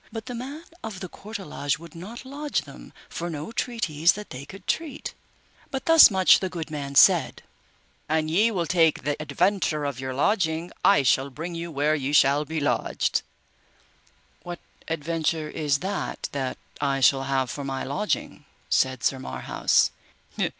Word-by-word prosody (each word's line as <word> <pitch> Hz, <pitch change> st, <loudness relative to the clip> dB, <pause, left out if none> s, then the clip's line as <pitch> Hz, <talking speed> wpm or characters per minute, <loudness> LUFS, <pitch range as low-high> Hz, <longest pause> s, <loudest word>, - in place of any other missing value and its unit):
But 225 Hz, -1 st, -6 dB
the 245 Hz, -, -6 dB
man 270 Hz, +7 st, -6 dB, 0.2 s
of 220 Hz, -4 st, -6 dB
the 185 Hz, -, -5 dB
courtelage 195 Hz, -8 st, -4 dB
would 165 Hz, 0 st, -13 dB
not 210 Hz, +10 st, -9 dB
lodge 290 Hz, +2 st, -2 dB
them -, -, -13 dB, 0.2 s
for 170 Hz, +1 st, -5 dB
no 155 Hz, +5 st, -5 dB
treatise 185 Hz, -, +1 dB
that 210 Hz, 0 st, -9 dB
they 130 Hz, +2 st, -7 dB
could 195 Hz, -, -12 dB
treat, 305 Hz, -4 st, -3 dB, 0.6 s
but 265 Hz, -1 st, -4 dB
thus 325 Hz, -1 st, +9 dB
much 190 Hz, -3 st, +5 dB
the 190 Hz, -, -2 dB
good 165 Hz, -3 st, -6 dB
man 140 Hz, -2 st, -5 dB
said, -, -, +5 dB, 0.7 s
An 155 Hz, 0 st, +1 dB
ye 200 Hz, +9 st, +3 dB
will 185 Hz, -6 st, -1 dB
take 165 Hz, -5 st, +3 dB
the 145 Hz, +2 st, 0 dB
adventure 155 Hz, 0 st, 0 dB
of 140 Hz, -3 st, -3 dB
your 130 Hz, -1 st, -4 dB
lodging, 165 Hz, 0 st, +1 dB
I 200 Hz, -7 st, +5 dB
shall 135 Hz, +2 st, +3 dB
bring 165 Hz, +6 st, -6 dB
you 170 Hz, 0 st, -5 dB
where 150 Hz, 0 st, +1 dB
ye 145 Hz, -1 st, -2 dB
shall 145 Hz, +1 st, +4 dB
be 160 Hz, +1 st, -3 dB
lodged. 145 Hz, -, 0 dB, 1.2 s
What 175 Hz, 0 st, -6 dB, 0.3 s
adventure 160 Hz, 0 st, -1 dB
is 145 Hz, -2 st, 0 dB
that 195 Hz, +2 st, -3 dB
that 135 Hz, -2 st, -3 dB, 0.2 s
I 140 Hz, -1 st, +1 dB
shall 135 Hz, +1 st, +4 dB
have 135 Hz, -2 st, 0 dB
for 145 Hz, -, -5 dB
my 135 Hz, -1 st, -3 dB
lodging? 145 Hz, +10 st, -2 dB, 0.2 s
said 130 Hz, -2 st, +1 dB
Sir 135 Hz, -, +1 dB
Marhaus. 65 Hz, -, +1 dB
160 Hz, 165 wpm, -25 LUFS, 140-195 Hz, 1.2 s, thus